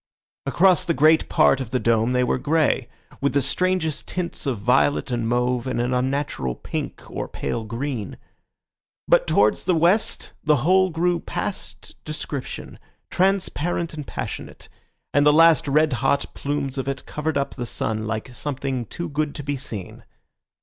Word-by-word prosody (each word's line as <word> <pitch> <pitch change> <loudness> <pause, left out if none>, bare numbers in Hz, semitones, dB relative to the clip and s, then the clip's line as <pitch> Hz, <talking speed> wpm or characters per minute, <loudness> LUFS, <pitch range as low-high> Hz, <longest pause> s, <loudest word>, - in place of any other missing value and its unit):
Across 180 +4 +4
the 170 - 0
great 155 +2 +4
part 135 - +4
of 125 - -5
the 130 +1 0
dome 115 +1 +2
they 125 0 +3
were 125 - 0
grey, 150 -4 +1 0.3
with 140 -1 +1
the 140 - +4
strangest 170 +2 0
tints 175 -4 -4
of 130 -4 0
violet 75 - +2
and 115 -2 -1
mauve 125 0 0
and 125 - -1
an 120 +1 0
unnatural 125 - -1
pink - - -5
or - - -4
pale 115 - -3
green; 115 0 -4 0.9
but - - +4
towards - - +3
the 180 - +3
west 175 +7 +1
the 150 -4 +2
whole 185 +1 +4
grew 175 +1 +1
past - - -5
description, 150 -3 -6 0.3
transparent 175 -3 0
and 150 -3 -7
passionate, - - -6 0.4
and 145 - +4
the 150 - +6
last 165 0 +5
red 150 +1 +3
hot 140 +3 0
plumes 140 -1 -3
of 135 - -3
it 135 -1 -3
covered 150 0 -2
up 140 - -1
the 120 - -5
sun 110 -1 -2
like 110 +3 -4
something 130 -3 -3
too 170 +8 -5
good 150 -1 -2
to 145 - -5
be 145 +1 -2
seen. 110 -8 -7
140 Hz, 165 wpm, -23 LUFS, 125-160 Hz, 0.9 s, the